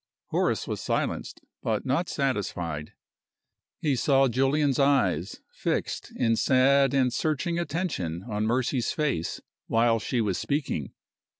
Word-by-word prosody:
Horace - - 0
was - - -3
silenced, - - -2 0.2
but 110 -2 -1
not 140 +7 0
satisfied. 90 - -2 0.9
He 145 -4 +2
saw 135 +3 +3
Julian's 135 +3 +2
eyes 105 - +2
fixed - - -2
in 115 -2 +2
sad 135 +2 +4
and 130 -3 +2
searching 160 +4 0
attention 145 - -2
on 105 -1 -1
Mercy's 125 0 0
face 140 - -1 0.3
while 115 0 +3
she 120 +3 -1
was 100 -5 0
speaking. 140 - -2
130 Hz, 120 wpm, -27 LUFS, 110-140 Hz, 0.9 s, sad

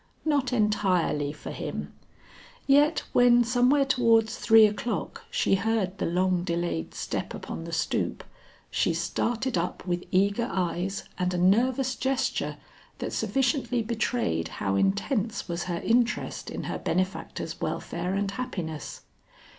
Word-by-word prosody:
Not 285 -5 +1
entirely 195 - +1
for 150 - -8
him - - -5 0.7
yet 290 +3 +4
when 245 -1 +6
somewhere 250 +4 +3
towards 230 -4 +3
three 225 -1 +6
o'clock, 215 +1 -3
she - - +1
heard 200 -1 0
the - - 0
long 180 +1 +1
delayed 170 - -2
step - - -3
upon 165 - -6
the 170 - -7
stoop, 165 - -1 0.5
she - - +1
started 240 -3 -1
up 175 +1 -4
with 175 -1 -1
eager 200 +6 +2
eyes 185 +1 -2 0.2
and 180 0 0
a - - 0
nervous 245 +8 +3
gesture 265 0 -1 0.4
that - - -4
sufficiently 265 -3 0
betrayed 220 - -1
how 95 - -1
intense 200 - 0
was 175 -1 -3
her 175 -2 -2
interest 240 +1 0
in - - -5
her - - -4
benefactor's 185 +3 -2
welfare 180 +3 -2
and 200 0 0
happiness. 180 - -5
205 Hz, 130 wpm, -27 LUFS, 180-245 Hz, 0.7 s, when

